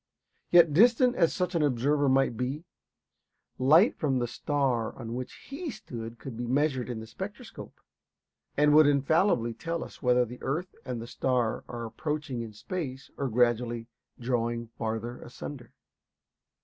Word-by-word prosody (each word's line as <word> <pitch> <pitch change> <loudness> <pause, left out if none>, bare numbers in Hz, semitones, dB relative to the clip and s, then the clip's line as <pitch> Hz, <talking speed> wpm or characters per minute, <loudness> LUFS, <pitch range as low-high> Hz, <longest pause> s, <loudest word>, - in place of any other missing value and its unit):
Yet 170 -3 +6
distant 245 - +5
as 165 - +3
such 180 -1 -1
an 170 - +1
observer 145 +1 +2
might 135 -2 +3
be, 135 +8 -3 0.9
light 155 - +6
from 135 -4 +1
the 120 - 0
star 125 -1 -1
on 115 -2 -6
which 125 +1 -4 0.2
he 325 +4 -4
stood 115 - -7
could 115 +2 -8
be 120 +1 -4
measured 130 -1 +1
in 120 -2 -4
the 110 - -7
spectroscope, 110 - -9 0.8
and 150 0 +5
would 155 0 +7
infallibly 140 - +2
tell 165 +6 -3
us - - -12
whether 125 -2 +4
the 125 +2 -10
earth 165 +7 -2
and 120 -2 -4
star 120 -2 0
are 120 -1 -5
approaching 145 +1 -3
in 115 -2 -7
space 135 - -5
or 140 -2 -2
gradually 120 0 +1 0.3
drawing 120 -1 -1
farther 115 +2 -4
asunder. 120 0 -9
130 Hz, 150 wpm, -28 LUFS, 120-150 Hz, 0.9 s, would